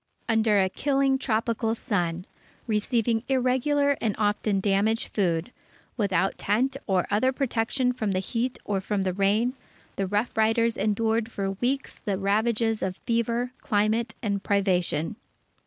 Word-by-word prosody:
Under 220 -2 +3
a 190 - +3
killing 270 +5 +1
tropical 225 -2 0
sun, 180 -7 -2 0.4
receiving 225 +1 +1
irregular 270 +2 +2
and 220 -4 0
often 210 -1 +1
damaged 205 +3 +1
food, 175 0 0 0.4
without 195 -3 0
tent 250 +7 +1
or 190 -3 +2
other 220 +6 +3
protection 250 -1 0
from 220 -4 -2
the 185 - 0
heat 235 +6 -2
or 195 -2 -1
from 200 0 -1
the 185 -1 -1
rain, 205 +6 +2 0.4
the 195 - 0
Rough 205 +5 -1
Riders 225 +1 +2
endured 225 +2 0
for 195 -2 -2
weeks 250 +8 -2
the 200 -2 -2
ravages 220 +3 +1
of 185 0 -2
fever, 235 +1 0
climate, 220 +2 0
and 200 -2 -1
privation. 190 -3 0
220 Hz, 140 wpm, -26 LUFS, 200-240 Hz, 0.4 s, Under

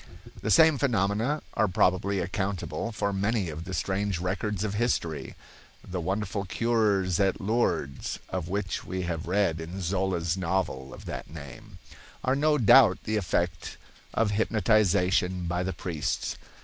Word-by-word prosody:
The 110 - -2
same 155 +7 +6
phenomena 115 +3 +1
are 110 - +2
probably 90 +2 +2
accountable 95 +4 -3
for 100 -2 -1
many 100 -2 0
of 80 +2 -7
the 95 - -6
strange 95 +1 -1
records 95 +3 -2
of 105 -2 -2
history. 100 -8 -1 0.5
The 90 -1 -3
wonderful 100 +2 -2
cures 100 -4 +1
at 95 -2 +2
Lourdes 100 - -1
(of 90 -3 -3
which 95 -1 -2
we 95 0 -4
have 85 -2 -3
read 90 -4 +1
in 85 +4 -6
Zola's 90 -2 0
novel 85 -8 -2
of - - -11
that - - -6
name) 90 +7 -10 0.5
are 130 - +2
no 150 +1 +3
doubt 125 +1 +7
the 110 0 -1
effect 90 -3 -1 0.4
of 110 -2 +2
hypnotization 95 -4 +2
by 90 +1 -1
the 95 +1 -1
priests. 85 -5 -3
95 Hz, 145 wpm, -28 LUFS, 90-110 Hz, 0.5 s, doubt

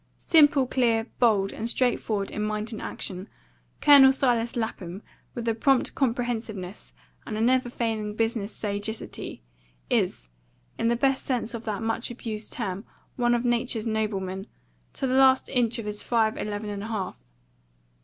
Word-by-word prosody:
Simple, 290 -4 +5
clear, 235 -3 +1
bold, 205 -5 +3
and 225 +2 -3
straightforward 225 -5 0
in 210 - -4
mind 215 +1 -2
and 220 - -6
action, 185 +2 -5 0.5
Colonel 280 -2 +8
Silas 240 -4 +1
Lapham, 200 -5 -4 0.3
with 235 -1 -4
a 230 - +3
prompt 260 +3 +2
comprehensiveness 230 -7 -2 0.4
and 215 - -3
a - - -2
never 250 +2 +3
failing 220 -3 -2
business 225 -2 -1
sagacity, 205 - -4 0.5
is, - - 0 0.5
in - - +1
the 235 - +3
best 270 +2 +1
sense 245 -3 -2
of 230 -1 -6
that 215 0 -3
much 225 +2 -1
abused 225 -3 -6
term, 200 -4 -3 0.3
one 240 -1 +2
of 240 +1 -1
nature's 240 -2 +1
noblemen, 200 -3 -2 0.5
to - - -2
the 255 - 0
last 265 0 +5
inch 245 -3 +1
of 230 - -5
his 210 0 -3
five 225 -2 +1
eleven 210 0 -4
and 200 -1 -5
a 215 - -5
half. 210 -5 -4
225 Hz, 155 wpm, -26 LUFS, 210-245 Hz, 0.5 s, Colonel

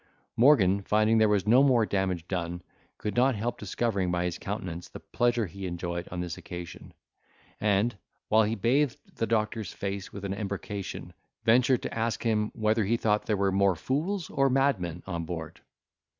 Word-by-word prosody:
Morgan 105 -7 +5
finding 110 +2 +3
there 110 -1 +5
was 100 -2 +2
no 120 +5 +6
more 125 -5 +4
damage 95 -4 -1
done, 90 -1 -3 0.3
could 105 - -4
not 130 +1 +3
help 115 +3 -3
discovering 100 -2 -1
by 90 0 0
his 90 -1 -3
countenance 90 -4 -5
the - - -9
pleasure 120 -2 0
he 95 +2 -6
enjoyed 85 0 -4
on 90 0 -4
this 85 -2 -5
occasion; 90 -1 -9 0.6
and, 105 +3 +2 0.3
while 110 +1 +5
he 110 +1 +1
bathed 125 +5 +2 0.2
the 115 - 0
doctor's 110 -2 -1
face 100 -1 -4
with 100 0 -7
an 95 - -2
embrocation, 100 -1 -5 0.3
ventured 125 +2 +4
to - - -4
ask 115 0 -1
him, 110 -2 +1
whether 110 0 +2
he 115 +4 +1
thought 105 -2 0
there 105 - +1
were 100 0 +2
more 100 -1 +3
fools 155 - -2
or 135 -2 +2
madmen 110 - 0
on 85 -3 -3
board? 80 -2 -6
105 Hz, 175 wpm, -28 LUFS, 90-115 Hz, 0.6 s, no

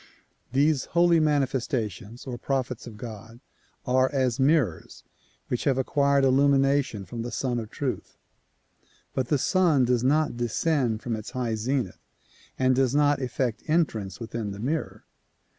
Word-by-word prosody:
These 140 +1 +2
holy 170 -1 +5
mani 150 -3 +3
festations 120 - -4
or 130 -3 -5
prophets 130 -3 -2
of 110 -3 -10
God 115 +1 -9 0.5
are 130 0 +2
as 130 -3 0
mirrors 135 - +1 0.4
which 125 - -2
have 135 -2 +2
acquired 140 +1 +2
illumination 135 -4 +2
from 115 +2 -6
the 120 - -4
Sun 125 -3 -1
of 110 -2 -6
Truth, - - -4 1.0
but 130 -2 -1
the 145 - +2
Sun 160 -3 +3
does 120 -1 +1
not 150 +1 +2
descend 120 -1 0
from 120 -2 -2
its 110 -1 -7
high 125 -3 -2
zenith 115 -1 -2 0.6
and 130 0 +3
does 130 0 +2
not 145 -1 +3
effect 125 -2 -2
entrance 115 - 0
within 115 -2 -4
the 100 0 -7
mirror. 150 +8 -3
130 Hz, 145 wpm, -26 LUFS, 115-140 Hz, 1.0 s, holy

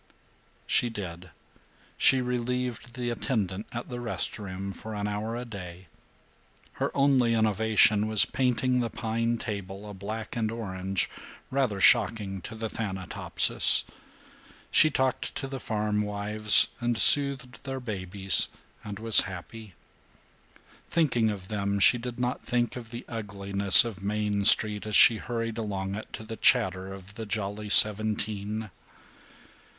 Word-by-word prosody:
She 120 - +1
did. 90 -5 -8 0.7
She 130 -1 +3
relieved 125 -1 -4
the 120 -1 -3
attendant 105 -5 -3
at 120 0 -7
the 120 - -6
rest 115 -1 -4
room 95 -1 -7
for 110 +2 -9
an 105 0 -3
hour 105 +2 -4
a 120 +1 -6
day. 90 -5 -10 0.9
Her - - 0
only 130 -4 +2
innovation 110 -1 +2
was 110 -1 +5
painting 125 0 -1
the 120 -1 -2
pine 115 0 -3
table 100 -2 -7
a 105 - -9
black 105 +3 -7
and 110 -2 -2
orange 95 -4 -3 0.4
rather 130 -7 -1
shocking 105 -3 +2
to 110 - -9
the 110 0 -5
Thanatopsis. 95 -5 +2 0.9
She 155 - +6
talked 130 -2 -2
to - - -4
the 135 0 -7
farmwives 105 -1 +1
and 120 -1 -2
soothed 135 -3 +3
their 135 -1 -5
babies 95 -4 +2 0.4
and 105 -2 -8
was 110 0 +5
happy. 95 +3 -11 1.1
Thinking 125 -9 +1
of 100 -3 -7
them 100 -1 -3
she 120 +5 +5
did 120 0 -7
not 125 +1 -3
think 120 -1 -2
of 120 -3 -9
the 120 +1 -9
ugliness 100 -1 +4
of 105 -4 -8
Main 105 0 -2
Street 105 0 +5
as 105 - -2
she 115 - +7
hurried 115 0 -5
along 100 -3 -4
it 110 +2 -8
to - - -7
the 110 0 -9
chatter 95 -6 +1
of 95 +1 -12
the 110 0 -8
Jolly 105 0 -4
Seventeen. 105 0 +3
110 Hz, 140 wpm, -26 LUFS, 100-120 Hz, 1.1 s, she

